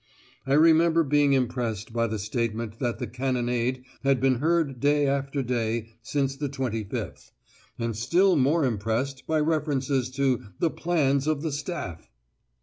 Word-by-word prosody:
I 135 - +2
remember 165 +2 +5
being 145 -1 +3
impressed 120 -4 -1
by 115 0 +1
the 110 0 -3
statement 110 +1 -3
that 120 -2 -1
the - - -3
cannonade 125 0 -1 0.2
had 135 -1 +3
been 130 -1 +2
heard 155 -4 +1
day 145 +1 +3
after 140 0 -1
day 115 -2 -1
since 135 +3 -1
the 145 0 -3
25th, 120 -6 -4 0.5
and 115 -2 -2
still 175 - +3
more 145 +2 +3
impressed 120 +4 -2
by 160 -1 +2
references 145 -4 0
to 135 -4 +1 0.2
"the 165 - +1
plans 145 -5 +1
of 155 -1 0
the 160 - -1
Staff!" 145 - -5
135 Hz, 145 wpm, -26 LUFS, 115-145 Hz, 0.5 s, remember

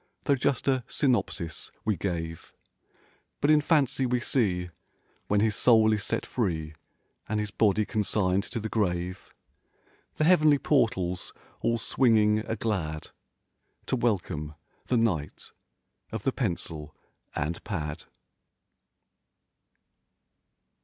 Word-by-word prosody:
Though 140 - +3
just 140 +1 0
a 130 -2 +2
synopsis 95 - -1
we 110 -2 +2
gave; 80 -3 -4 0.8
But 145 - +3
in 150 -1 +6
fancy 140 -4 +2
we 125 0 +1
see, 95 -9 0 0.6
when 105 0 +2
his 110 -1 +2
soul 110 -2 +5
is 105 -2 -1
set - - -2
free 80 -9 -2 0.6
And 110 0 0
his 105 -1 -3
body 105 0 +2
consigned 100 -4 +1
to - - -4
the 110 - -3
grave. 90 -4 -2 0.8
The - - 0
heavenly 155 -3 +5
portals 95 - 0 0.3
all 115 - +1
swinging 110 -2 +3
a 110 +1 -3
glad 85 -9 -3 0.7
To - - 0
welcome 90 -10 -1 0.3
the 125 - +2
knight 90 -11 -1 0.6
of 110 -2 -4
the 135 - +2
pencil 80 - -3 0.4
and 75 +3 -2
pad. 75 -6 -4
105 Hz, 115 wpm, -28 LUFS, 90-120 Hz, 0.8 s, in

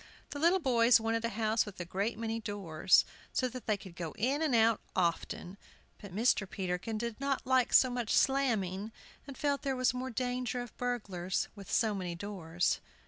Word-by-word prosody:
The 285 - -5
little 340 +5 +4
boys 240 -5 +5
wanted 225 0 -1
a - - 0
house 220 0 +1
with 205 -3 -10
a 175 - -4
great 200 +6 -2
many 225 0 -2
doors, 190 -5 +2 0.3
so 255 - +1
that 250 0 -9
they 215 -2 +2
could 190 -3 -12
go 165 -3 -5
in 265 +8 +1
and 300 -6 +2
out 225 0 +4
often. 180 +1 -1 0.4
But 200 - -9
Mr. 205 -1 +2
Peterkin 185 +4 -3
did 235 +2 -4
not 275 -1 -1
like 260 -2 +3
so 255 - +6
much 245 -3 -3
slamming, 220 -7 +1 0.4
and 275 - -8
felt 285 -2 0
there 270 -2 -1
was 255 -1 +2
more 255 +1 -3
danger 250 0 -2
of 245 -2 -7
burglars 195 -7 -2
with 200 -2 -10
so 220 -3 +2
many 180 -3 -4
doors. 175 -3 -1
225 Hz, 190 wpm, -32 LUFS, 195-250 Hz, 0.4 s, so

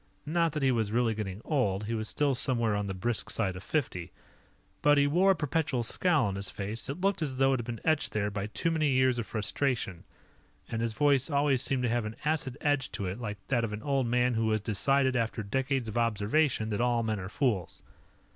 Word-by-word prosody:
Not 165 0 +1
that 150 -2 -2
he 135 - +4
was 110 -4 0
really 115 0 +2
getting 105 -2 -5
old; 105 - 0
he 110 +2 -3
was 110 -1 -2
still 145 -2 +1
somewhere 120 -4 +1
on 105 0 -2
the 95 - -4
brisk 110 +5 -2
side 95 -5 0
of 90 - -7
fifty. 95 - -2 0.7
But 145 0 +5
he 140 - +5
wore 175 +7 +3
a 195 - +5
perpetual 150 -4 -1
scowl 150 +3 +2
on 100 - -1
his 100 - -3
face 105 +3 -5
that 140 +6 -5
looked 195 -2 +1
as 135 -4 -2
though 135 0 +4
it 130 - 0
had 120 - -4
been 115 -2 -4
etched 155 -2 +2
there 105 -1 -1
by 100 0 -3
too 165 +9 -1
many 155 -2 +1
years 130 -2 +3
of 110 - -4
frustration, 105 -3 -2 0.6
and 115 - -3
his 115 -1 -1
voice 140 +3 +3
always 140 -3 +2
seemed 135 -2 0
to 125 - +1
have 120 -1 0
an 110 +1 -5
acid 145 -4 0
edge 145 -3 +1
to 100 - -3
it, 95 +5 -4
like 105 -4 -4
that 125 -4 +2
of 110 -2 -2
an 105 +1 -6
old 135 -3 +1
man 125 +1 +2
who 110 -1 +1
has 110 -1 +1
decided, 130 +6 +1
after 115 -2 -1
decades 130 +3 -1
of 110 +2 -2
observation, 115 +2 +1
that 105 - -1
all 120 -1 +2
men 110 -2 -1
are 95 0 -6
fools. 105 -7 -1
120 Hz, 230 wpm, -29 LUFS, 105-140 Hz, 0.7 s, But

